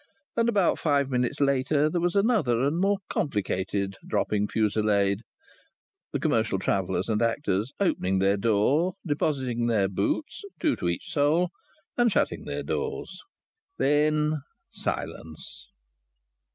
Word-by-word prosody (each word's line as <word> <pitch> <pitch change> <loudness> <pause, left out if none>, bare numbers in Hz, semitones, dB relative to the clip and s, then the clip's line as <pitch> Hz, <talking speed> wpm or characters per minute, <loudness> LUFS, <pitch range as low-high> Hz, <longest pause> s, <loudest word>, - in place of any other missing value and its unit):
And 230 0 +2
about 200 -6 +2
five 140 -3 +1
minutes 125 +3 0
later 140 +1 +2
there 170 +2 -1
was 175 +1 0
another 200 - +3
and 145 +5 +1
more 200 +2 +2
complicated 100 - -2
dropping 105 -1 0
fusillade 105 -2 +1 0.9
the - - -1
commercial 115 -10 +1
travellers 95 0 -1
and 110 -1 0
actors 115 -1 0
opening 95 - +1
their 95 +1 +3
doors, 115 - +2
depositing 130 -6 0
their 105 -5 +2
boots 100 - -2 0.2
(two 310 -4 +2
to - - -1
each 85 - -4
soul), 160 +5 +2 0.5
and 240 -2 +4
shutting - - 0
their - - -3
doors. - - -4 0.6
Then 150 +1 +2 0.3
silence. 80 -1 -5
130 Hz, 125 wpm, -27 LUFS, 100-155 Hz, 0.9 s, and